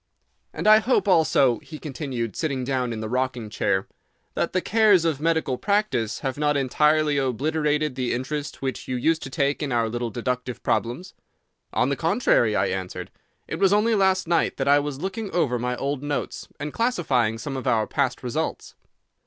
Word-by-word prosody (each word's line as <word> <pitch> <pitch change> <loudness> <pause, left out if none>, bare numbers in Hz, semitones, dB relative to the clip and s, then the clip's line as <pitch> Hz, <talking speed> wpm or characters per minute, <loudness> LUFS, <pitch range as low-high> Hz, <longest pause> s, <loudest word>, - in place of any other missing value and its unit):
"And - - -6
I 215 0 +8
hope, 235 -1 +1
also," 155 - +4
he 155 - -10
continued, 130 - -4
sitting 140 -5 -2
down 125 -2 -1
in 110 -1 -4
the 110 - -3
rocking 125 -2 -2
chair, 95 -2 0 0.5
"that - - -1
the 185 - +1
cares 205 -3 +4
of 155 -4 0
medical 160 -5 0
practice 200 - 0
have 135 0 -3
not 150 -1 +2
entirely 150 +2 +2
obliterated 150 +3 0
the 125 -1 -2
interest 140 +4 -4
which 130 -1 -3
you 130 - -2
used 160 +6 +1
to 135 - -6
take 140 0 0
in 145 -3 -2
our 115 -2 +1
little 120 +1 -3
deductive 125 +2 -3
problems." 125 +11 -1 0.6
"On - - +1
the - - 0
contrary," - - +2
I - - +2
answered, - - -4 0.4
"it - - -4
was 195 -1 +4
only 210 +3 +3
last 190 -3 +2
night 170 0 +1
that - - -1
I 145 +1 +6
was 145 -2 -4
looking 200 +3 -4
over 125 -8 +1
my 125 +1 -1
old 140 0 -2
notes, 145 0 -4
and 150 0 -5
classifying 135 - +1
some 135 +4 -5
of 130 - -4
our 110 -2 +2
past 140 -2 -1
results." 120 -2 -3
140 Hz, 185 wpm, -24 LUFS, 125-165 Hz, 0.6 s, I